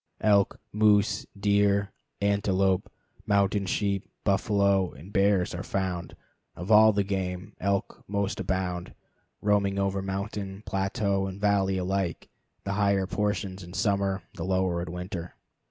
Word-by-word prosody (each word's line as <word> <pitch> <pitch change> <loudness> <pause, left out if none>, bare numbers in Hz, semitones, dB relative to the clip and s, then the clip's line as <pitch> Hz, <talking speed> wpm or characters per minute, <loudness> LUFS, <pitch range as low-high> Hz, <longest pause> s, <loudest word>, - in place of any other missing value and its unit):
Elk, 100 -2 +3
moose, 105 -1 +3
deer, 100 0 +2 0.3
antelope, 100 -2 +1 0.4
mountain 100 -1 +2
sheep, 100 0 -1
buffalo, 100 -2 +2
and 85 +9 -13
bears 100 -3 +3
are 85 - -4
found. 95 -3 -3 0.4
Of 90 +5 -5
all 110 +1 +8
the 100 -1 +1
game, 95 -2 -3
elk 100 0 -1
most 100 0 -1
abound, 90 -2 -2 0.5
roaming 100 -1 +2
over 100 0 0
mountain, 95 +1 -4
plateau, 95 0 0
and 95 +1 -7
valley 100 -2 +2
alike, 95 -1 -2 0.3
the 100 - -2
higher 100 -2 +2
portions 100 -1 -2
in 90 0 -10
summer, 100 -3 0
the 80 - -6
lower 95 -1 0
in 85 -1 -5
winter. 90 -1 -6
100 Hz, 130 wpm, -27 LUFS, 95-100 Hz, 0.5 s, all